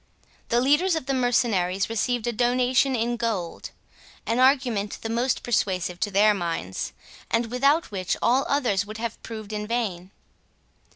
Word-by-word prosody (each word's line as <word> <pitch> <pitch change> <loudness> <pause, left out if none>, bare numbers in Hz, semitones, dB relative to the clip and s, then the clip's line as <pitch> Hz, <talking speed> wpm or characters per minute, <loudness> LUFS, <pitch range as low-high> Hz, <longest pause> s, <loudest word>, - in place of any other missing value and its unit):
The 235 - +3
leaders 295 +8 +3
of 320 - -3
the 275 - -1
mercenaries 220 -7 +1
received 230 +1 -1
a 240 - 0
donation 250 +3 +2
in 240 +1 -1
gold; 215 -8 -3 0.6
an 230 +2 0
argument 255 -6 +2
the 225 - -3
most 240 +3 0
persuasive 185 -6 -1
to 205 - 0
their 205 +2 +4
minds, 165 - -3 0.4
and 230 0 0
without 275 +5 +2
which 185 -3 -2
all 260 +3 +3
others 245 -9 +1
would 215 +2 -8
have 230 0 -5
proved 215 -2 -8
in 210 0 -3
vain. 200 -7 -2
230 Hz, 155 wpm, -25 LUFS, 205-250 Hz, 0.6 s, their